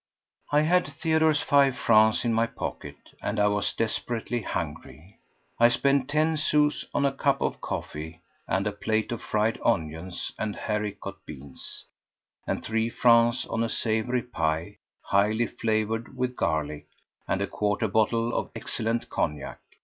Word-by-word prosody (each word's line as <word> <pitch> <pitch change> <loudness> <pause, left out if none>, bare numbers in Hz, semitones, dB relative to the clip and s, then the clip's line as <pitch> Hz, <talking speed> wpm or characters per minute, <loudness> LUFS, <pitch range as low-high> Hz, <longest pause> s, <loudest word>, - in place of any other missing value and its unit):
I 145 +1 +5
had 175 +3 +3
Theodore's 160 0 +2
five 140 -3 +4
francs 110 +1 +4
in 115 - +2
my 115 +1 +2
pocket, - - -6 0.2
and 105 +1 -2
I 105 - +4
was 105 0 0
desperately 115 +1 -2
hungry. 80 -2 -6 0.4
I 120 - +8
spent 140 +2 +2
ten 155 +2 +2
sous 150 -1 +2
on 140 - +1
a 140 - +3
cup 140 0 +1
of - - -2
coffee 80 +2 -5 0.3
and 95 +2 0
a 105 - 0
plate 110 +2 -1
of 120 - -3
fried 110 +1 0
onions 80 +3 -1
and 105 -1 -2
haricot 105 -2 -3
beans, 70 -2 -7 0.6
and - - -2
three 115 +1 0
francs 120 +1 +4
on 115 - -1
a 115 - -1
savoury 115 +3 0
pie, 80 -8 -2 0.3
highly 105 +4 +2
flavoured 110 +3 -2
with 125 0 -1
garlic, 75 -4 -1 0.4
and 95 - 0
a 100 - +1
quarter 105 +2 0
bottle 115 +3 +1
of - - -1
excellent 115 +1 -1
cognac. 75 -3 -3
110 Hz, 150 wpm, -27 LUFS, 100-125 Hz, 0.6 s, I